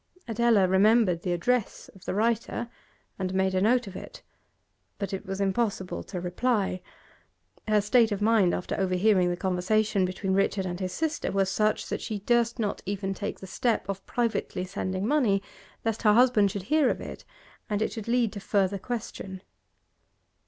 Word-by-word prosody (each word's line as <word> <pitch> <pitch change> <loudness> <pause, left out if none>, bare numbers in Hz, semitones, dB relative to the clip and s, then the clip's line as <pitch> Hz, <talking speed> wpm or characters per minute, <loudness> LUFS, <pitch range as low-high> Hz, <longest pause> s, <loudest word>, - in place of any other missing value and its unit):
Adela 225 -4 +3
remembered 190 -1 +4
the 180 - -2
address 225 +6 0
of 190 - -17
the - - -2
writer, 230 +2 0 0.5
and 185 0 -2
made 190 0 +2
a 185 - +1
note 240 +4 +3
of 195 - -9
it, - - -9 0.7
but 200 -2 -4
it 190 - -5
was 195 0 -4
impossible 195 -1 -1
to 185 - -6
reply. 190 +1 0 0.9
Her 215 -1 +3
state 225 +2 +3
of 205 - -1
mind 210 -4 +4
after 180 - -3
overhearing 185 0 +3
the 175 - -2
conversation 190 +3 +1
between 190 +1 -1
Richard 195 0 +1
and 175 -1 -4
his 185 -1 -3
sister 320 - -2
was 195 -1 +1
such 215 +1 +1
that - - -3
she 215 -2 -3
durst 235 +3 +1
not 210 -4 -2
even 195 -1 -2
take 205 +1 -5
the - - -7
step 225 +3 -1
of 195 -1 -4
privately 230 -6 -1
sending 185 0 -3
money, 220 -7 +2 0.4
lest 225 -1 -1
her 210 -2 +5
husband 230 -4 +5
should 200 -1 -5
hear 300 +4 +3
of - - -1
it - - -8 0.5
and 205 -1 0
it - - -2
should 220 -1 -6
lead 235 -2 +1
to 205 - -6
further 195 0 0
question. 195 -4 -6
200 Hz, 175 wpm, -27 LUFS, 190-225 Hz, 0.9 s, her